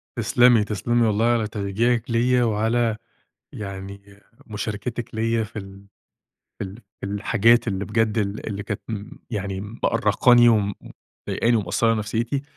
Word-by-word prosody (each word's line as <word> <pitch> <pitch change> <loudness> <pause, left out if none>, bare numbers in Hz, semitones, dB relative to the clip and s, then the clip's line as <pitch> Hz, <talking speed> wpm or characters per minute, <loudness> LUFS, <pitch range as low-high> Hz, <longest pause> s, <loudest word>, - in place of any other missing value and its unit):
تسْلمي، 120 0 +4
تسْلمي 115 +3 0
والله 110 +1 +1
على 115 -2 +2
تشجيعِك 110 +3 -1
ليّا، 125 +2 +3
وعلى 115 0 +1 0.6
يعني 100 0 -8 0.3
مشاركتِك 115 +3 -5
ليّا 115 0 0
في 105 0 -8
ال 100 0 -10 0.7
في - - -3
ال 95 +1 -8 0.3
في - - -4
الحاجات 115 +4 +2
اللي 100 -1 -2
بجد 110 0 0
ال 100 0 -2
اللي 100 -1 -4
كانت 105 0 -4
م 105 -2 -6
يعني 100 -3 -3 0.2
مأرّقاني 120 +2 +4
وم 105 -3 +2 0.5
ومضايقاني 120 0 +2
ومأثرة 115 +2 +1
نفسيتي، 115 +5 -2
110 Hz, 135 wpm, -23 LUFS, 100-115 Hz, 0.7 s, تسْلمي